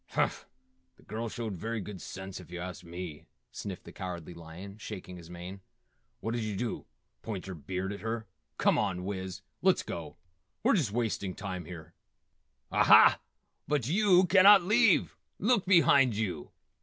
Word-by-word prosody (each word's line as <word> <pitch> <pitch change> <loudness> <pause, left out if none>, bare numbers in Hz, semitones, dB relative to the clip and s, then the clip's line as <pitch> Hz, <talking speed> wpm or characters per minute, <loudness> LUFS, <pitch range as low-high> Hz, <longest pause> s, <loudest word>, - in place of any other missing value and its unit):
"Humph, - - 0 0.5
the - - -21
girl 115 +2 -4
showed 110 -3 -4
very 115 +5 -3
good 100 -2 -7
sense, 95 0 -7
if 90 - -13
you 90 0 -6
ask 90 +1 -6
me," 85 -3 -8 0.2
sniffed 95 -3 -6
the - - -11
Cowardly 90 -3 -6
Lion, 85 +5 -10
shaking 90 -3 -7
his 85 -2 -12
mane, 90 +2 -8 0.6
"What 115 +2 -2
did 120 -1 -1
you 105 -2 -3
do? 115 +4 -3 0.3
Point 105 -5 -5
your 95 - -6
beard 95 +5 -4
at 100 - -7
her? 110 +1 -3 0.3
Come - - +3
on, 90 0 -1
Wiz! 95 -1 -5 0.2
Let's 190 0 +3
go. 85 -2 -7 0.5
We're 260 - +4
just 160 - +2
wasting 105 -5 -2
time 95 -4 -5
here." 80 -2 -10 0.8
"Aha, - - +7 0.5
but 145 -4 0
yew 185 +2 +5
cannot 195 +1 +7
leave! 210 +2 +3 0.2
Look 215 -2 +2
behind 140 - +5
yew!" 95 -8 -3
100 Hz, 160 wpm, -30 LUFS, 90-120 Hz, 0.8 s, Aha